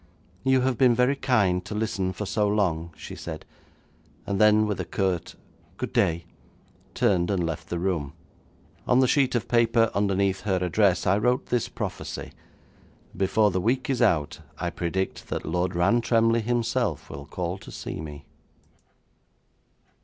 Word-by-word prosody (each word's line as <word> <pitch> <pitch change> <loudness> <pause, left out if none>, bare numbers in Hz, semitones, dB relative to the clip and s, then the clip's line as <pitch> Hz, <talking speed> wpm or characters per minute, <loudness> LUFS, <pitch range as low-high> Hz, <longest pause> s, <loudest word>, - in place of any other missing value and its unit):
'You 130 -1 +3
have 125 -2 0
been 125 -3 +5
very 125 +3 +3
kind 100 -10 +1
to 105 - -6
listen 100 -4 -1
for 95 +3 -5
so 105 +2 +1
long,' 85 -6 0
she - - -8
said, - - -7 0.8
and 100 0 -1
then, 105 0 +5
with 105 -2 -2
a - - -1
curt 95 -4 -2 0.4
'Good - - -4
day!' 85 0 +1 0.7
turned 90 -3 +2
and 95 -4 0
left 80 0 -5
the 85 - -2
room. 85 -6 -2 0.7
On 125 - +4
the 130 - +4
sheet 130 -1 +2
of 120 - -1
paper 115 -1 +3
underneath 100 -1 +1
her 95 -3 0
address, 90 +1 +2
I 95 +2 +3
wrote 125 +3 +1
this 120 -2 -1
prophecy: - - -5 0.8
'Before 100 +3 +2
the 95 0 -1
week 130 +6 0
is 130 - -1
out, 85 -11 +2 0.2
I 85 - -2
predict 90 +3 -3
that - - -3
Lord 90 +3 -1
Rantremly 115 +5 +3
himself 120 +1 -1
will 70 0 -8
call 90 +1 -4
to - - -12
see - - -6
me.' 75 -2 -9
100 Hz, 155 wpm, -26 LUFS, 90-115 Hz, 0.8 s, been